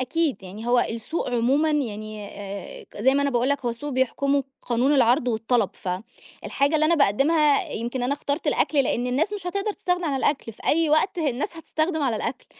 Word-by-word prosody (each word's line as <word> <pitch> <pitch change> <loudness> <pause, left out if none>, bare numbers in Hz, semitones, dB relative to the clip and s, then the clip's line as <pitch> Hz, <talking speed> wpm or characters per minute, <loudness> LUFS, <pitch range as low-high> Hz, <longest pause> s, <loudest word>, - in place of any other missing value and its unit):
أكيد، 295 +1 -1
يعني 200 +5 -8
هو 245 0 +4
السوق 235 +8 -3
عمومًا 265 +6 +2
يعني 215 -7 -3
آآ 200 -2 -8 0.2
زي 265 +5 +4
ما 280 - +2
أنا 280 - +1
باقول 245 +1 +1
لك، 280 -2 -1
هو 240 - +1
السوق 290 +6 -6
بيحكمه 275 +1 +1 0.2
قانون 245 +4 +1
العرض 250 0 +3
والطلب، 225 -1 +1
فالحاجة 235 - -3
اللي 310 0 +4
أنا 340 - +4
باقدّمها 290 +4 +3
يمكن 240 +3 -3
أنا 250 +3 +1
اخترت 285 +1 -3
الأكل 280 -4 +2
لأن 245 +1 -1
الناس 290 +11 0
مش 395 -4 -5
هتقدر 400 +3 -1
تستغنى 360 -3 -1
عن 285 - 0
الأكل، 265 -3 -1
في - - -13
أي 325 +1 +3
وقت 325 +4 +2
الناس 290 +1 -1
هتستخدم 315 0 -1
على 250 -5 +1
الأكل، 255 +4 -4
270 Hz, 190 wpm, -24 LUFS, 235-305 Hz, 0.2 s, هو